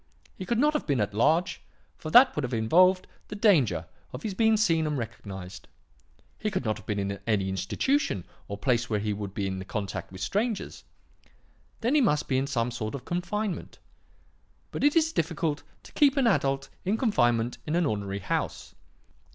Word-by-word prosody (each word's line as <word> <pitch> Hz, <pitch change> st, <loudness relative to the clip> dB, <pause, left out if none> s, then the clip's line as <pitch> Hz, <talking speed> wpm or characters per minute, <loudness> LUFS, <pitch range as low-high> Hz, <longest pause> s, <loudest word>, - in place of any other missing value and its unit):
He 185 Hz, -, -7 dB
could 235 Hz, -, +1 dB
not 300 Hz, +5 st, +3 dB
have 300 Hz, -, -2 dB
been 140 Hz, -4 st, +1 dB
at 105 Hz, -1 st, -1 dB
large, 160 Hz, -, +2 dB, 0.3 s
for 155 Hz, -, -7 dB
that 250 Hz, +9 st, +7 dB
would 150 Hz, -, 0 dB
have 125 Hz, -2 st, -2 dB
involved 180 Hz, +12 st, +4 dB, 0.2 s
the 210 Hz, -, -7 dB
danger 140 Hz, -, +3 dB, 0.3 s
of 125 Hz, +3 st, -8 dB
his 210 Hz, -, -2 dB
being 220 Hz, +2 st, +3 dB
seen 165 Hz, -7 st, +2 dB
and 150 Hz, -1 st, -1 dB
recognized. 100 Hz, -6 st, -7 dB, 0.7 s
He 215 Hz, -, -1 dB
could 165 Hz, -, -3 dB
not 110 Hz, -1 st, 0 dB
have -, -, -14 dB
been 105 Hz, -2 st, -1 dB
in 100 Hz, 0 st, -2 dB
any 100 Hz, -4 st, +1 dB
institution 95 Hz, -, 0 dB, 0.2 s
or 100 Hz, -, -5 dB
place 120 Hz, 0 st, 0 dB
where 105 Hz, -2 st, +1 dB
he 105 Hz, 0 st, -1 dB
would 100 Hz, -1 st, -6 dB
be 100 Hz, -, -1 dB
in 95 Hz, -1 st, -3 dB
contact 100 Hz, -3 st, -4 dB
with 95 Hz, -, -9 dB
strangers. 220 Hz, +1 st, -2 dB, 1.0 s
Then 240 Hz, +4 st, +1 dB
he 300 Hz, -, +5 dB
must 150 Hz, -, +2 dB
be 130 Hz, -1 st, +2 dB
in 135 Hz, -, -1 dB
some 120 Hz, -3 st, -1 dB
sort 115 Hz, 0 st, -4 dB
of 130 Hz, -2 st, -8 dB
confinement. 180 Hz, +3 st, -3 dB, 0.9 s
But -, -, -4 dB
it 290 Hz, +2 st, +4 dB
is 320 Hz, -1 st, +3 dB
difficult 160 Hz, -2 st, -1 dB, 0.2 s
to -, -, -14 dB
keep 285 Hz, -1 st, +3 dB
an 270 Hz, -, +3 dB
adult 135 Hz, -, +1 dB
in 200 Hz, +4 st, 0 dB
confinement 120 Hz, -, +1 dB
in 155 Hz, -, 0 dB
an 175 Hz, -1 st, +2 dB
ordinary 100 Hz, -5 st, -2 dB
house. 100 Hz, -, -3 dB
140 Hz, 190 wpm, -27 LUFS, -, 1.0 s, that